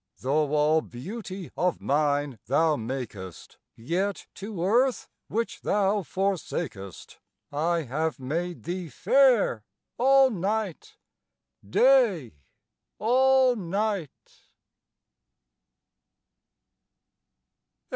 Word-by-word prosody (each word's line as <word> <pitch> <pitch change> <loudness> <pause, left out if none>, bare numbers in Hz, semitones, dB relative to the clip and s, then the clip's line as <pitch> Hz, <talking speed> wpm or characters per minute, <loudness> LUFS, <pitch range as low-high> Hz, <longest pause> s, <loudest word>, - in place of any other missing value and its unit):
Though 145 +2 0
all 150 +2 +3
beauty 185 - -8
of 180 -1 0
nine 145 -3 0
thou 155 +5 +3
makest, 110 - -7 0.2
Yet 180 - -2
to 200 -3 -6
earth 245 +6 +2 0.2
which 230 +2 -3
thou 205 0 +1
forsakest 170 - -4 0.3
I 165 +3 0
have 155 +4 -2
made 170 +7 -4
thee 175 -1 -4
fair 240 - +3 0.4
all 270 +1 +5
night, 200 -1 -3 0.7
Day 200 - +3 0.6
all 260 +2 +4
night. 200 - -4
175 Hz, 75 wpm, -26 LUFS, 145-215 Hz, 0.7 s, all